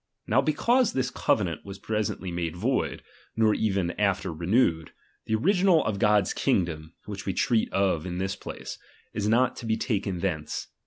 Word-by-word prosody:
Now 125 Hz, +5 st, +3 dB
because 235 Hz, -, +2 dB
this 125 Hz, -1 st, -1 dB
covenant 90 Hz, -9 st, 0 dB
was 100 Hz, -1 st, -8 dB
presently 105 Hz, -3 st, -2 dB
made 85 Hz, -1 st, -3 dB
void, 85 Hz, -, -1 dB, 0.3 s
nor 110 Hz, -1 st, +4 dB
ever 95 Hz, -5 st, 0 dB
after 100 Hz, -4 st, +1 dB
renewed, 85 Hz, -1 st, +1 dB, 0.3 s
the 110 Hz, -, +1 dB
original 180 Hz, -, +3 dB
of 100 Hz, -3 st, -1 dB
God's 105 Hz, -3 st, +3 dB
kingdom 80 Hz, -2 st, -1 dB
(which 100 Hz, -1 st, -7 dB
we 95 Hz, -, 0 dB
treat 115 Hz, +4 st, +1 dB
of 95 Hz, -4 st, +1 dB
in 90 Hz, -1 st, -4 dB
this 95 Hz, +1 st, -2 dB
place) -, -, -8 dB, 0.3 s
is 105 Hz, 0 st, -1 dB
not 120 Hz, +4 st, +3 dB
to 115 Hz, -, -6 dB
be 110 Hz, 0 st, +1 dB
taken 100 Hz, -6 st, -1 dB
thence. 80 Hz, -6 st, -3 dB
100 Hz, 165 wpm, -27 LUFS, 90-115 Hz, 0.3 s, nor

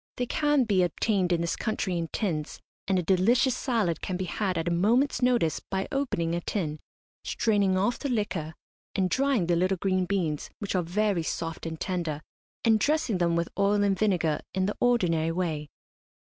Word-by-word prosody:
They 245 Hz, -, 0 dB
can 295 Hz, +1 st, +2 dB
be 200 Hz, -5 st, +2 dB
obtained 180 Hz, +1 st, +1 dB
in 170 Hz, -1 st, +2 dB
this 170 Hz, -1 st, -1 dB
country 210 Hz, -4 st, -2 dB
in 170 Hz, -1 st, -2 dB
tins, 160 Hz, -7 st, -3 dB, 0.3 s
and 190 Hz, -1 st, +2 dB
a 180 Hz, -, 0 dB
delicious 235 Hz, +9 st, +3 dB
salad 220 Hz, -, 0 dB
can 185 Hz, -, -3 dB
be 185 Hz, -, -2 dB
had 185 Hz, 0 st, -2 dB
at 165 Hz, +1 st, -2 dB
a -, -, +1 dB
moment's 230 Hz, +13 st, +2 dB
notice 240 Hz, -10 st, +2 dB
by 190 Hz, 0 st, -3 dB
opening 250 Hz, -, -1 dB
a 170 Hz, -, -1 dB
tin, 155 Hz, -6 st, -3 dB, 0.4 s
straining 200 Hz, -4 st, +1 dB
off 205 Hz, +6 st, +1 dB
the 280 Hz, -, -3 dB
liquor, 180 Hz, -9 st, -2 dB, 0.4 s
and 185 Hz, -2 st, +1 dB
drying 265 Hz, -6 st, +2 dB
the 175 Hz, 0 st, +2 dB
little 185 Hz, +2 st, +1 dB
green 185 Hz, 0 st, 0 dB
beans, 170 Hz, -7 st, -1 dB
which 205 Hz, -, -4 dB
are 185 Hz, -, +2 dB
very 195 Hz, +2 st, 0 dB
soft 165 Hz, 0 st, -4 dB
and 160 Hz, -1 st, -6 dB
tender, 165 Hz, -5 st, -3 dB, 0.4 s
and 220 Hz, -1 st, +5 dB
dressing 285 Hz, -, +1 dB
them 170 Hz, -1 st, +2 dB
with 170 Hz, 0 st, 0 dB
oil 205 Hz, +1 st, +3 dB
and 195 Hz, -2 st, +1 dB
vinegar, 175 Hz, -8 st, +1 dB, 0.2 s
in 190 Hz, 0 st, +1 dB
the 205 Hz, -, -2 dB
ordinary 170 Hz, -10 st, +2 dB
way. 160 Hz, -4 st, -2 dB
185 Hz, 190 wpm, -27 LUFS, 170-215 Hz, 0.4 s, and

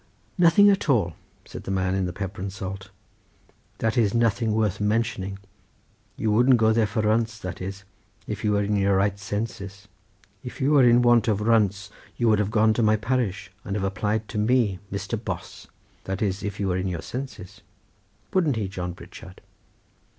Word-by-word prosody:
"Nothing 180 Hz, +3 st, +6 dB
at 195 Hz, -5 st, -1 dB
all," 100 Hz, -, +2 dB, 0.3 s
said -, -, -9 dB
the -, -, -6 dB
man 95 Hz, -1 st, 0 dB
in 95 Hz, -1 st, 0 dB
the -, -, -3 dB
pepper 95 Hz, +1 st, -6 dB
and 95 Hz, 0 st, -3 dB
salt; 95 Hz, -1 st, -7 dB, 0.9 s
"that 115 Hz, +2 st, 0 dB
is 110 Hz, -1 st, +2 dB
nothing 115 Hz, -1 st, +2 dB
worth 105 Hz, -3 st, 0 dB
mentioning. 105 Hz, -3 st, -1 dB, 0.8 s
You 110 Hz, -1 st, 0 dB
wouldn't 125 Hz, +4 st, +5 dB
go 110 Hz, -1 st, +3 dB
there 110 Hz, -1 st, +2 dB
for 110 Hz, +2 st, -2 dB
runts, 110 Hz, +1 st, +1 dB
that 90 Hz, -2 st, -7 dB
is 95 Hz, +1 st, -6 dB, 0.4 s
if -, -, -5 dB
you 105 Hz, -, +2 dB
were 100 Hz, 0 st, +2 dB
in 105 Hz, +1 st, 0 dB
your 100 Hz, -1 st, +2 dB
right 100 Hz, +1 st, +1 dB
senses; 100 Hz, -1 st, -5 dB, 0.6 s
if 125 Hz, -, -8 dB
you 135 Hz, +2 st, +2 dB
were 145 Hz, -2 st, +6 dB
in 120 Hz, 0 st, +5 dB
want 120 Hz, -2 st, +4 dB
of 105 Hz, -3 st, +1 dB
runts 105 Hz, -2 st, +1 dB, 0.3 s
you 120 Hz, -, +1 dB
would 105 Hz, -1 st, +4 dB
have 105 Hz, -1 st, 0 dB
gone 110 Hz, 0 st, +3 dB
to 115 Hz, -, 0 dB
my 110 Hz, -1 st, +4 dB
parish 105 Hz, -4 st, -2 dB
and 100 Hz, -, -4 dB
have 100 Hz, -2 st, -1 dB
applied 105 Hz, +2 st, -1 dB
to 110 Hz, -, -3 dB
me 110 Hz, -4 st, +2 dB
Mr. 100 Hz, -, -4 dB
Bos; -, -, -6 dB, 0.4 s
that 95 Hz, +3 st, -2 dB
is 100 Hz, -1 st, -1 dB
if 105 Hz, -1 st, -5 dB
you 100 Hz, -1 st, 0 dB
were 90 Hz, -, 0 dB
in 95 Hz, +1 st, -2 dB
your 85 Hz, -3 st, -4 dB
senses. 105 Hz, -7 st, -7 dB, 0.7 s
Wouldn't 165 Hz, -8 st, +2 dB
he, 105 Hz, -3 st, -2 dB
John 90 Hz, -2 st, -5 dB
Pritchard?" 90 Hz, +1 st, -12 dB
105 Hz, 190 wpm, -25 LUFS, 95-115 Hz, 0.9 s, Nothing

